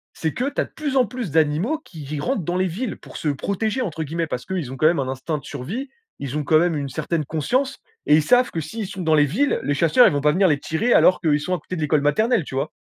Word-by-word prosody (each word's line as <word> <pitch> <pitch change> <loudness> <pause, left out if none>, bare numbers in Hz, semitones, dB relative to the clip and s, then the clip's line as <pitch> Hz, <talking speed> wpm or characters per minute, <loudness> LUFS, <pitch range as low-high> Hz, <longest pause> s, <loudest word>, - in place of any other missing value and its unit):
c'est 160 - -2
que 250 - -2
tu 285 - -1
as - - -1
de - - -17
plus 290 -3 -4
en 255 - +5
plus 240 - -5
d'animaux 160 - +1
qui 160 -5 -10
ils 145 +1 -5
rentrent 250 - -1
dans 175 +3 -2
les 185 0 +1
villes 205 +5 -4
pour - - -11
se - - -4
«protéger» 200 - -2
entre 160 -5 -3
guillemets. 165 +2 -3
Parce 125 -4 -5
qu'ils 175 -9 -4
ont 135 - -7
quand 155 - +1
même 170 -2 +2
un 135 - -1
instinct 140 +4 -3
de - - -19
survie, 190 - -5 0.3
ils 140 +1 -4
ont 150 - -1
quand 155 +2 +4
même 175 -1 +1
une 140 -1 -3
certaine 155 +2 -2
conscience 255 - -1 0.3
et 150 - +6
ils - - +4
savent 250 +7 +3
que 165 - -3
s'ils 220 +7 -5
sont 195 -2 -7
dans 160 -1 +3
les 150 -1 +5
villes, 235 - +1
les 145 - 0
chasseurs 165 - +5
ils - - +2
vont 145 - 0
pas 150 +1 +4
venir 190 +3 +4
les 145 -4 +2
tirer 220 +13 0
alors 185 - +5
qu'ils 150 -4 +2
sont 180 +4 -1
à - - -5
côté 185 - -7
de 160 - -4
l'école 150 -1 +2
maternelle, 215 - +2
tu - - -9
vois? 140 +3 -2
165 Hz, 295 wpm, -22 LUFS, 150-215 Hz, 0.3 s, et